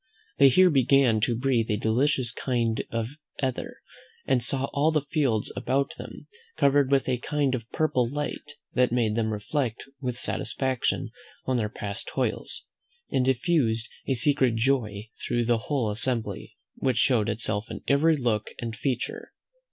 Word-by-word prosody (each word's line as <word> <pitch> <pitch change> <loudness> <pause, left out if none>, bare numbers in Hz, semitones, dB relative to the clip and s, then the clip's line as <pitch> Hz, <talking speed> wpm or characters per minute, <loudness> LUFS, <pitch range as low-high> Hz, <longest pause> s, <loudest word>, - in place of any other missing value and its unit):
They 140 -1 +8
here 185 +7 +6
began 135 -4 +4
to 120 +1 +1
breathe 125 -3 +1
a 105 - +1
delicious 120 +3 +1
kind 115 -2 -1
of 115 0 -2 0.3
ether, 130 -2 -2 0.5
and 130 -2 +2
saw 130 +3 0
all 145 +3 +3
the 150 -3 0
fields 130 -9 +1
about 135 +2 0
them - - -9 0.3
covered 140 -1 +4
with 140 -1 +2
a 125 -2 0
kind 145 0 0
of 120 -2 -4
purple 130 -6 +1
light, 145 +1 -4 0.2
that 125 -1 +3
made 115 -3 +1
them 110 -1 0
reflect 115 +3 -2 0.2
with 125 -3 -3
satisfaction 130 0 -1 0.3
on 130 -1 +1
their 110 -3 0
past 100 -1 -5
toils, - - -2 0.5
and 130 - +2
diffused 125 -4 +1 0.2
a 135 - +1
secret 130 -2 +2
joy 115 -4 0 0.2
through 120 -1 +1
the 120 -1 +2
whole 130 -8 +1
assembly, 115 - -1 0.2
which 130 -3 0
showed 115 -3 +3
itself 110 0 -2
in - - -7
every 155 +3 +4
look 115 -5 0
and 115 -2 -5
feature. 125 +1 -3
125 Hz, 155 wpm, -26 LUFS, 115-140 Hz, 0.5 s, They